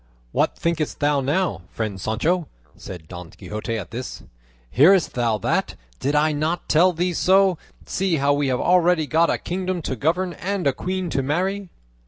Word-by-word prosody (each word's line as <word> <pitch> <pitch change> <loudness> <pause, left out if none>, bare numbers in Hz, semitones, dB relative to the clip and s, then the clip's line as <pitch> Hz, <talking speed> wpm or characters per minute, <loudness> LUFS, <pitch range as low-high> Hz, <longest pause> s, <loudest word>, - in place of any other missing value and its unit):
"What - - +1
thinkest 165 -3 -2
thou 145 -1 +2
now, 145 - 0
friend 105 -4 -4
Sancho?" 155 - 0 0.3
said 85 -4 -10
Don 90 -1 -9
Quixote 110 +3 -5
at 105 - -7
this. 125 +2 -6 0.5
"Hearest 170 - +5
thou 120 -3 +1
that? - - -1 0.2
Did 145 +2 0
I 155 +1 +3
not 155 +4 -2
tell 175 +4 +5
thee 175 +1 -1
so? 190 0 +3 0.3
See 190 -2 0
how 140 -1 +2
we 145 0 0
have 125 -1 0
already 175 -2 +3
got 160 +3 +2
a - - +1
kingdom 185 -1 -3
to 130 - -2
govern 175 +8 0
and 195 -1 -3
a 140 - +3
queen 185 +1 -3
to 135 - 0
marry!" 185 +7 -1
155 Hz, 175 wpm, -22 LUFS, 130-180 Hz, 0.5 s, Hearest